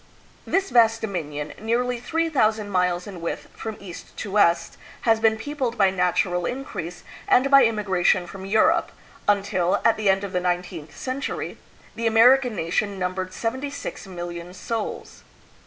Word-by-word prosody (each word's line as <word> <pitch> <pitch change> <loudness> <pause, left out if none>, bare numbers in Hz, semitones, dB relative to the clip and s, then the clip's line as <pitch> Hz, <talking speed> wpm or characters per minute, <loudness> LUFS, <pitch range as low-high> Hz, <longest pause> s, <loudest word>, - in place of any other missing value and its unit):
This 390 0 0
vast 225 -2 +5
dominion, 155 -8 -4
nearly 240 +2 0
three 330 +6 -1
thousand 215 -8 +1
miles 180 -1 +1
in 190 -4 -8
width 170 - -4
from 220 -1 -6
east 185 -4 -11
to 205 - -5
west, 170 -4 +2 0.2
has 225 -1 +3
been 220 0 +3
peopled 255 -1 -3
by 195 -2 +4
natural 180 -1 +1
increase 180 -10 -5 0.2
and 270 +2 +4
by 275 -1 +8
immigration 190 -5 +2
from 190 +2 -9
Europe, 215 +2 +3 0.4
until, 195 -3 +2
at 230 - +4
the 215 -2 +1
end 195 +1 +2
of 200 - -4
the 180 - +2
nineteenth 175 -3 -3
century, 260 +2 -4 0.3
the 230 0 -1
American 245 +2 +5
nation 195 +4 -1
numbered 185 0 -3
sev 225 +4 -2
enty 280 +2 -5
six 285 -7 -7
million 175 -1 -7
souls. 220 +4 -5
205 Hz, 155 wpm, -24 LUFS, 180-230 Hz, 0.4 s, by